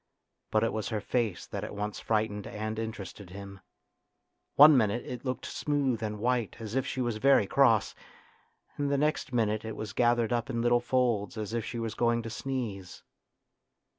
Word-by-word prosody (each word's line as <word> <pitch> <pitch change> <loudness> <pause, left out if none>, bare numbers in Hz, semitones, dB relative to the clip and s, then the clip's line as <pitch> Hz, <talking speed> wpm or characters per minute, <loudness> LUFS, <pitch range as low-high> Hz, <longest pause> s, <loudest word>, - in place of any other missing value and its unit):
But 110 - +2
it 115 - 0
was 110 -1 -2
her 110 -2 -1
face 110 -3 -1
that - - -5
at - - -6
once 105 0 -3
frightened 105 -2 -1
and 110 +1 -4
interested 105 -4 -6
him. 100 +1 -9 1.0
One 150 +1 +9
minute 120 -1 +1
it 125 -2 -6
looked 130 -2 -3
smooth 140 -6 -1
and 105 -1 -3
white 120 0 0
as 110 -2 -6
if 135 0 0
she 130 - -2
was 120 -3 -1
very 135 -2 +5
cross, - - +3 0.8
and 145 -1 0
the 140 - +2
next 150 -1 0
minute 110 -3 +1
it 110 -1 -5
was 110 0 -6
gathered 120 -1 +2
up 120 +2 -1
in 115 -2 -1
little 120 0 +3
folds 120 -4 0
as 110 0 -4
if 115 -1 -1
she 120 - -5
was 115 -2 -3
going 115 0 +1
to 115 - -6
sneeze. 115 -8 -5
115 Hz, 185 wpm, -29 LUFS, 105-125 Hz, 1.0 s, One